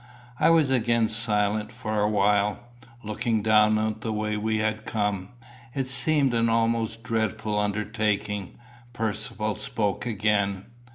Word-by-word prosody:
I -, -, +5 dB
was 160 Hz, -5 st, +4 dB
again 115 Hz, -2 st, +2 dB
silent 105 Hz, -1 st, +1 dB
for 110 Hz, -1 st, -3 dB
a 105 Hz, -, +2 dB
while. 105 Hz, 0 st, +2 dB, 0.5 s
Looking 110 Hz, +1 st, -1 dB
down 110 Hz, 0 st, +4 dB
on 110 Hz, 0 st, -1 dB
the 110 Hz, +1 st, -3 dB
way 105 Hz, 0 st, -2 dB
we 110 Hz, +1 st, -1 dB
had 110 Hz, 0 st, -1 dB
come, 105 Hz, -3 st, -1 dB, 0.5 s
it 135 Hz, -1 st, 0 dB
seemed 140 Hz, 0 st, +2 dB
an 115 Hz, 0 st, +2 dB
almost 115 Hz, 0 st, 0 dB
dreadful 110 Hz, -2 st, -1 dB
undertaking. 105 Hz, -1 st, -2 dB, 0.4 s
Percivale 110 Hz, -1 st, -2 dB
spoke 105 Hz, +1 st, -2 dB
again. 100 Hz, -3 st, 0 dB
110 Hz, 130 wpm, -26 LUFS, 105-115 Hz, 0.5 s, I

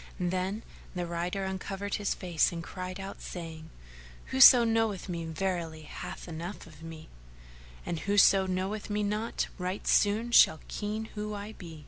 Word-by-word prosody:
Then 185 Hz, +4 st, -1 dB, 0.3 s
the 175 Hz, -1 st, -2 dB
rider 175 Hz, +3 st, -2 dB
uncovered 195 Hz, +1 st, -4 dB
his 205 Hz, -1 st, -1 dB
face 175 Hz, -4 st, +1 dB
and 170 Hz, -1 st, -5 dB
cried 185 Hz, +1 st, -6 dB
out, 195 Hz, 0 st, -7 dB
saying, 160 Hz, -2 st, -7 dB, 0.6 s
"Whoso 260 Hz, -2 st, +9 dB
knoweth 225 Hz, -4 st, 0 dB
me 170 Hz, -2 st, -4 dB
verily 165 Hz, -2 st, -3 dB
hath -, -, -8 dB
enough 170 Hz, +4 st, -6 dB
of 155 Hz, -2 st, -15 dB
me, 165 Hz, -1 st, -9 dB, 0.8 s
and 170 Hz, -, -3 dB
whoso 195 Hz, -1 st, +4 dB
knoweth 190 Hz, +4 st, -2 dB
me 210 Hz, 0 st, 0 dB
not 210 Hz, +3 st, -1 dB
right 185 Hz, +2 st, -3 dB
soon[FN#447] 220 Hz, +4 st, +2 dB
shall 160 Hz, -, +7 dB
ken 215 Hz, +1 st, -3 dB
who 210 Hz, 0 st, -4 dB
I 205 Hz, +1 st, -6 dB
be. 165 Hz, -7 st, -10 dB
190 Hz, 150 wpm, -30 LUFS, 170-210 Hz, 0.8 s, Whoso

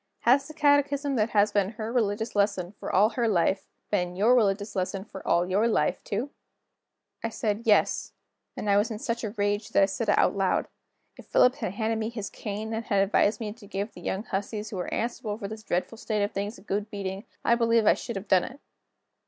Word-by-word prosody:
"Has 260 Hz, +4 st, +4 dB
the 310 Hz, -, -11 dB
catechism 285 Hz, -1 st, +2 dB
that 215 Hz, +1 st, +2 dB
has 210 Hz, -1 st, +3 dB
been 205 Hz, +1 st, +1 dB
her 220 Hz, +1 st, -5 dB
religious 220 Hz, -2 st, 0 dB
lesson, 200 Hz, -3 st, +1 dB
for -, -, -4 dB
all 205 Hz, +4 st, +5 dB
her 235 Hz, +1 st, 0 dB
life, 190 Hz, -1 st, +1 dB, 0.2 s
been 180 Hz, -3 st, 0 dB
your 215 Hz, +6 st, +4 dB
religious 205 Hz, -3 st, +1 dB
lesson, 190 Hz, +1 st, -2 dB
for 190 Hz, -3 st, -9 dB
all 175 Hz, +1 st, +3 dB
your 200 Hz, +5 st, +2 dB
life, 230 Hz, -, +1 dB
too?" 235 Hz, +8 st, -3 dB, 0.9 s
I 230 Hz, -, 0 dB
said: 220 Hz, +1 st, -2 dB
"Yes" 210 Hz, -, +3 dB, 0.5 s
and -, -, -4 dB
I 200 Hz, 0 st, +4 dB
was 205 Hz, +3 st, +2 dB
in 220 Hz, -, -4 dB
such 235 Hz, -1 st, -3 dB
a 215 Hz, -, -1 dB
rage 205 Hz, +1 st, 0 dB
that -, -, +4 dB
I -, -, +7 dB
said 200 Hz, +3 st, -3 dB
it -, -, +4 dB
out -, -, +3 dB
loud. 190 Hz, -2 st, +1 dB, 0.5 s
If -, -, -13 dB
Philip 250 Hz, +1 st, +4 dB
had 185 Hz, -, -3 dB
handed 220 Hz, +1 st, -1 dB
me 220 Hz, 0 st, -2 dB
his 215 Hz, -4 st, -6 dB
cane, 215 Hz, +2 st, -5 dB
and 225 Hz, +1 st, -3 dB
had 195 Hz, -2 st, +3 dB
advised 205 Hz, +1 st, +2 dB
me 215 Hz, -3 st, -4 dB
to 215 Hz, -2 st, -15 dB
give 200 Hz, +2 st, -3 dB
the 175 Hz, -, -11 dB
young 190 Hz, +3 st, -2 dB
hussies 210 Hz, +1 st, -4 dB
who 200 Hz, -, -4 dB
were 180 Hz, -, -4 dB
answerable 220 Hz, -2 st, -2 dB
for 205 Hz, -3 st, -5 dB
this 220 Hz, +1 st, -7 dB
dreadful 210 Hz, +3 st, -2 dB
state 215 Hz, -3 st, -1 dB
of 205 Hz, -, -1 dB
things 205 Hz, +3 st, -4 dB
a -, -, -15 dB
good 205 Hz, +1 st, -2 dB
beating, 195 Hz, 0 st, -5 dB, 0.2 s
I -, -, +5 dB
believe 230 Hz, -1 st, +3 dB
I -, -, +7 dB
should 235 Hz, -, -6 dB
have 195 Hz, +2 st, -5 dB
done 185 Hz, -2 st, +4 dB
it. 265 Hz, +2 st, -10 dB
210 Hz, 225 wpm, -27 LUFS, 200-230 Hz, 0.9 s, I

